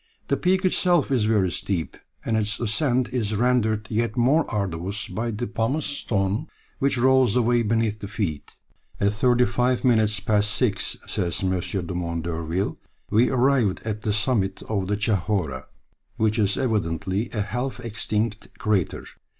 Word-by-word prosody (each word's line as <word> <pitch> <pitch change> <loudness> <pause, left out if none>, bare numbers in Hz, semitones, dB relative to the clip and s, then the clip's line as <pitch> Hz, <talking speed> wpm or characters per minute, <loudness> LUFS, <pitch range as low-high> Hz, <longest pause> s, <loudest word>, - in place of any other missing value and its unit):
The - - +3
peak 185 +1 +1
itself 175 -5 +2
is 120 -5 +2
very 105 -5 +2
steep, 85 -2 -2 0.3
and 115 - 0
its 105 0 0
ascent 120 +3 +1
is 110 -4 0
rendered 110 -2 +1
yet 115 +1 -1
more 140 +7 +3
arduous 100 0 -2
by 115 +2 -3
the 115 +2 -3
pumice 115 +8 -1
stone 105 -8 -1 0.3
which 140 -1 +2
rolls 130 -2 +4
away 120 -1 +3
beneath 110 -1 0
the 100 - -6
feet. 100 -9 -4 0.4
"At 100 +1 +2
thirty 125 +2 +3
five 125 +1 0
minutes 110 -4 +3
past 105 0 +1
six," 105 - 0
says 85 +1 -1
M. 95 -1 +1 0.3
Dumont 85 -2 -3
d'Urville, 85 +3 -2 0.3
"we 115 +4 +4
arrived 125 -6 +2
at 105 -1 -3
the 110 - -1
summit 105 -2 0
of 100 -4 -2
the 105 +1 0
Chahorra, 95 - -1 0.5
which 110 -1 +1
is 100 -1 +2
evidently 100 -3 -1
a 105 - -1
half 125 +6 -3
extinct 110 -2 -3
crater. 100 -6 0
110 Hz, 150 wpm, -24 LUFS, 100-120 Hz, 0.5 s, rolls